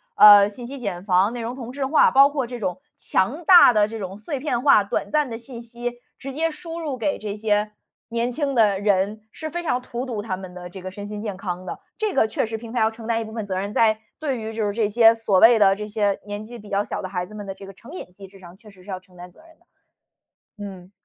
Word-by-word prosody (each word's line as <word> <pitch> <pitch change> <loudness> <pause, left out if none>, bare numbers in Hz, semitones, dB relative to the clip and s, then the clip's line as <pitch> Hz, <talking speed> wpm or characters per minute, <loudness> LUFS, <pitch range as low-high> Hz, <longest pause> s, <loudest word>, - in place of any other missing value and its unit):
呃， 205 -1 +9
信 240 +4 -10
息 275 +2 -8
茧 190 -7 -4
房、 195 +2 +2
内 240 - -5
容 235 +2 -4
同 245 -2 -7
质 275 +1 -3
化， 305 - +5
包 275 +1 +7
括 275 -4 -2
这 245 0 -7
种 185 -1 -3 0.2
强 275 - -1
大 350 -9 +8
的 210 -1 +3
这 225 0 -7
种 190 -1 -6
碎 265 +7 -5
片 255 -4 -1
化 275 -8 +6
短 200 - -3
暂 300 -3 +1
的 225 - -5
信 240 0 -10
息， 240 +1 -6 0.2
直 275 0 -7
接 325 +4 0
输 330 +1 -8
入 295 -5 -4
给 285 +5 -1
这 205 -1 -5
些 210 0 0 0.4
年 235 +1 -1
轻 275 +1 -2
的 210 -4 +3
人， 205 +1 +1
是 315 +4 -7
非 345 +1 -3
常 255 -7 -1
荼 245 0 -5
毒 225 -5 -3
他 195 -5 -3
们 185 -1 -10
的 180 0 -8
这 190 - -9
个 185 - -6
身 200 +2 -8
心 210 0 -6
健 205 -4 -5
康 185 -2 -5
的。 - - -6 0.2
这 430 -3 -1
个 220 - +4
确 220 - -1
实 225 0 -4
平 230 +1 -10
台 - - 0
要 220 - +3
承 225 0 -11
担 230 0 0
一 - - -3
部 220 - -10
分 220 -2 -4
责 190 -2 -4
任， 200 +1 -4
在 220 0 +3 0.2
对 275 -6 -2
于 220 0 -5
就 220 -1 -1
是 205 - -1
这 220 -2 0
些 225 +1 +6
所 220 -4 +1
谓 230 +2 +7
的， 195 -2 +5
这 210 +1 -6
些 205 -2 0
年 205 0 -6
纪 240 +2 -10
比 210 -2 -13
较 200 +1 +1
小 210 - -5
的 - - -3
孩 180 -1 -3
子 215 - -12
们 205 -1 -7
的 195 - -5
这 195 0 -12
个 195 - -10
成 230 +8 -15
瘾 320 - -8
机 195 +1 -12
制 195 0 -16
上， 175 0 -14
确 215 0 -16
实 190 -2 -19
是 200 - -15
要 185 -1 -4
承 185 0 -24
担 180 0 -11
责 - - -21
任 325 0 -21
的。 - - -32 1.0
嗯。 185 -2 -10
220 Hz, 300 characters per minute, -23 LUFS, 200-245 Hz, 1.0 s, 呃